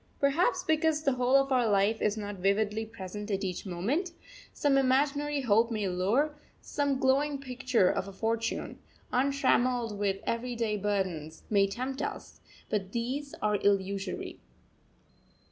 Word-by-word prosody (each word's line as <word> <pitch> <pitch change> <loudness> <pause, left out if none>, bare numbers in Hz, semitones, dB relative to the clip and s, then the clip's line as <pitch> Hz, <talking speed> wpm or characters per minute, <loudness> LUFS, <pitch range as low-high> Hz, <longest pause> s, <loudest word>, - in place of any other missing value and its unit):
Perhaps 295 - +2
because 315 -1 +1
the 275 - +3
whole 250 +1 +2
of 275 0 +4
our 250 -3 +3
life 205 +2 +2
is 210 +1 +1
not 205 -1 -5
vividly 210 +3 0
present 210 -1 -7
at 195 -1 -1
each 185 +1 -4
moment, 260 - -1 0.4
some 285 -2 +1
imaginary 280 +2 +2
hope 230 -1 +3
may 215 -4 -1
lure, 205 +12 +1 0.3
some 285 -2 -1
glowing 275 +2 +2
picture 255 -6 +1
of 190 - 0
a - - -7
future, 225 +3 -2 0.4
untrammelled 250 -3 +2
with 195 -1 0
everyday 230 -2 -1
burdens, 185 -7 -2
may 200 -1 +4
tempt 255 +6 -4
us; - - -6 0.3
but 195 -2 -2
these 265 +5 -3
are 210 -1 +2
illusory. 200 0 -1
230 Hz, 140 wpm, -30 LUFS, 200-275 Hz, 0.4 s, of